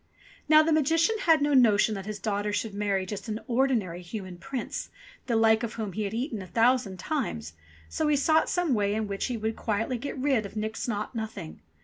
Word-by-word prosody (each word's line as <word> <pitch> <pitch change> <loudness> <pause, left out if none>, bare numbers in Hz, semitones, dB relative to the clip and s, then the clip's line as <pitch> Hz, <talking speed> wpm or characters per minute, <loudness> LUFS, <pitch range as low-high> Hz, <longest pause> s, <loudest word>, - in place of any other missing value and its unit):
Now 310 0 +8
the 325 - +1
Magician 325 +7 +3
had 320 -3 +5
no 290 0 +2
notion 220 -4 +5
that 195 -1 -6
his 215 -1 -4
daughter 205 0 -2
should 205 +1 -2
marry 200 -2 0
just 195 +1 -6
an 215 0 -3
ordinary 235 -9 0
human 185 -1 -7
prince, 255 +6 -5 0.4
the 235 - +1
like 220 0 +4
of 230 -2 -3
whom 215 -4 -4
he 215 +3 -2
had 200 - -4
eaten 235 -3 -3
a 185 - -8
thousand 230 0 +2
times, 180 - -3 0.3
so 310 - -1
he 300 - +3
sought 315 +3 +3
some 355 -6 +1
way 205 -2 +1
in 220 -1 -1
which 200 -1 -2
he 245 -3 -2
could 220 0 -2
quietly 225 +3 -1
get 280 +3 -5
rid 265 -4 +1
of 200 - -9
Nix 220 +2 -3
Naught 215 -1 -3
Nothing. 215 - -6
220 Hz, 215 wpm, -27 LUFS, 205-260 Hz, 0.4 s, Now